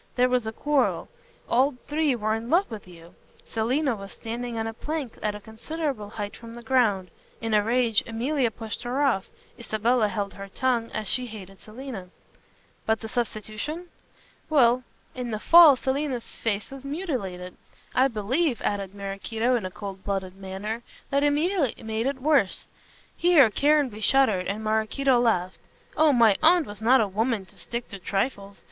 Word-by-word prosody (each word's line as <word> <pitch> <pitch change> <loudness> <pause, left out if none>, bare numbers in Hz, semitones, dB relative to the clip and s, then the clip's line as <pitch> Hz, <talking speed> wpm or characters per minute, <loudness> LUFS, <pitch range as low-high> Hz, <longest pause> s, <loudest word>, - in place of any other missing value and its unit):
There 250 0 +3
was 250 -3 +1
a - - -2
quarrel. 290 +4 0 0.4
All 260 +3 +3
three 300 -2 +1
were 215 -1 0
in 225 +2 -4
love 345 -1 +2
with 210 -4 -8
you. 170 -1 -14 0.3
Selina 250 +4 0
was 195 -1 -9
standing 235 +1 -5
on 225 - -1
a 225 - -4
plank 295 0 -4
at 210 -1 -1
a - - -7
considerable 230 +2 -5
height 205 -1 -5
from 230 0 -11
the 240 - -10
ground. 215 -8 +2 0.3
In 225 -1 -3
a 210 - +5
rage 230 -1 +2
Emilia 245 +3 0
pushed 220 0 -6
her 250 +4 -1
off. 235 -9 +1 0.3
Isabella 230 0 +1
held 205 -1 -3
her 195 0 -8
tongue 235 +2 0
as 215 -1 -3
she 255 -1 +1
hated 195 -4 -10
Selina." 220 -4 -8 0.8
"But 220 0 +1
the 225 - -5
substitution?" 240 - -4 0.6
"Well. 250 -5 +4 0.3
In 250 -1 -4
the 215 - -2
fall 330 +4 +8
Selina's 265 -1 -2
face 210 0 -2
was 275 -1 -9
much 275 - -6
mutilated. 190 - -4 0.4
I 260 +1 +4
believe," 255 +5 0
added 200 -1 -2
Maraquito, 210 +5 -1
in 215 -6 -1
a - - -7
coldblooded 195 -1 -5
manner, 195 +4 -5 0.3
"that 280 0 +2
Emilia 295 - +1
made 220 +2 -2
it 275 -1 -2
worse" 275 -7 +2 0.5
here 320 -10 +5
Caranby 280 -5 +2
shuddered 215 -7 +3
and 210 +2 -3
Maraquito 220 +5 +2
laughed 185 -6 +1 0.4
"oh, 310 -1 +5
my 230 -6 +5
aunt 330 +1 +5
was 205 -2 -9
not 250 +3 +5
a 215 - +1
woman 215 +1 -1
to - - -21
stick 235 -1 -6
at 195 -2 -8
trifles. 200 -1 -2
230 Hz, 170 wpm, -26 LUFS, 210-265 Hz, 0.8 s, fall